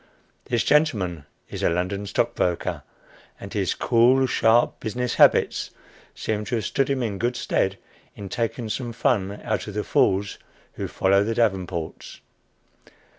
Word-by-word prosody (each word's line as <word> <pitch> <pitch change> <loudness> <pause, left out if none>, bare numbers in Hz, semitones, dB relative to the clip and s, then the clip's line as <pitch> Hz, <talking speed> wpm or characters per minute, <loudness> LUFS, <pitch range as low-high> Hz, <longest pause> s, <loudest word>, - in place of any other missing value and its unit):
This 120 -2 0
gentleman 95 - +1 0.2
is - - -7
a - - +3
London 90 +4 -2
stockbroker, 100 -4 -1 0.6
and - - -9
his - - 0
cool, 125 +3 +4
sharp 120 -1 +2
business 125 +3 -2
habits - - +4 0.5
seem 105 -1 -2
to 125 - -2
have 110 - -2
stood 135 0 0
him 135 -2 0
in 100 -4 -3
good 120 +1 0
stead 95 -5 0 0.4
in 100 - -8
taking 115 +3 -3
some 115 +2 -4
fun 105 -5 0
out 110 -1 -2
of 105 - -7
the 105 - -1
fools 100 +1 +1 0.3
who - - -4
follow 100 +1 +2
the 115 +2 -2
Davenports. 95 -7 -2
110 Hz, 145 wpm, -24 LUFS, 95-120 Hz, 0.6 s, cool